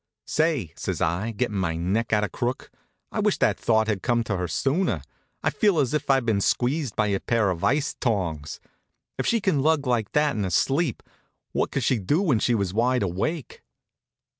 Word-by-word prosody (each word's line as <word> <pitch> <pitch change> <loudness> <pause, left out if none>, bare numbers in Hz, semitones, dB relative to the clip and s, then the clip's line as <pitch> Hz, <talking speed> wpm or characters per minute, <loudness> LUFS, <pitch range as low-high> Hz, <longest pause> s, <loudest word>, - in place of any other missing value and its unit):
"Say," 155 - 0
says - - -3
I, 85 +7 0
gettin' 105 -2 -1
me 80 -3 -1
neck 100 +7 -1
out 105 -1 +3
of 105 - -2
crook, 125 +1 -3 0.4
"I - - -3
wish - - +2
that - - +1
thought 110 -1 +2
had 105 -3 -1
come 120 -1 +1
to 105 -2 -2
her 90 -1 -2
sooner. 140 - 0 0.4
I - - +2
feel 205 -6 +2
as 140 -4 +1
if 150 -2 -2
I'd 135 -3 +3
been 105 -4 +1
squeezed 130 +3 0
by 110 - +2
a 100 -2 0
pair 115 -5 +1
of 85 -2 -5
ice 140 +1 +1
tongs. 85 - -2 0.6
If - - 0
she 230 - +3
can 190 -9 +1
hug 155 0 +2
like 120 -5 0
that 150 -1 +2
in 105 - -1
her 95 - -1
sleep, 135 - +1 0.5
what - - 0
could 135 - -2
she 120 0 +2
do 125 - +1
when 140 - +2
she 120 +2 +2
was 100 -4 -1
wide 120 +1 +2
awake?" 110 - -3
115 Hz, 205 wpm, -25 LUFS, 100-140 Hz, 0.6 s, out